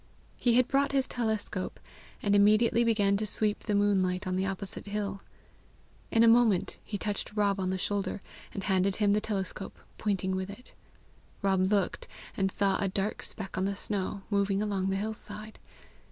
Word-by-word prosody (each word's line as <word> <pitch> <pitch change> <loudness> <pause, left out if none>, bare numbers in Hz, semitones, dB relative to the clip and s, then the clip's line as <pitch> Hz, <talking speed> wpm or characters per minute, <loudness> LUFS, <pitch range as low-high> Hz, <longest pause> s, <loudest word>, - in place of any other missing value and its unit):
He 240 -2 +2
had 250 0 +4
brought 280 +1 +1
his 270 -1 +3
telescope, 220 -5 -2 0.4
and 205 -1 +3
immediately 215 +3 +5
began 205 -4 +3
to 215 +1 -2
sweep 210 +1 0
the 210 - -1
moonlight 190 -2 +2
on 185 0 -1
the 190 +1 0
opposite 195 +1 -5
hill. 200 -1 -3 0.9
In 225 - +4
a - - +7
moment 225 -5 +4
he 205 - -4
touched 210 0 -3
Rob 200 -2 +2
on 185 -1 0
the 190 - -1
shoulder, 200 0 -2 0.3
and 195 - -5
handed 190 0 +2
him 205 -2 +2
the 210 +1 +3
telescope, 195 -3 -3 0.2
pointing 190 -3 0
with 190 +1 -3
it. 215 +5 -11 0.7
Rob 190 0 +2
looked 200 -3 0 0.3
and 195 -1 +1
saw 195 -1 +1
a 200 - +2
dark 195 +2 -1
speck 195 -3 -5
on 190 - +1
the 200 0 -1
snow, 200 -1 -2
moving 200 -1 +2
along 200 -2 0
the 195 - 0
hill 215 +3 -2
side. 215 0 -7
200 Hz, 180 wpm, -30 LUFS, 195-215 Hz, 0.9 s, a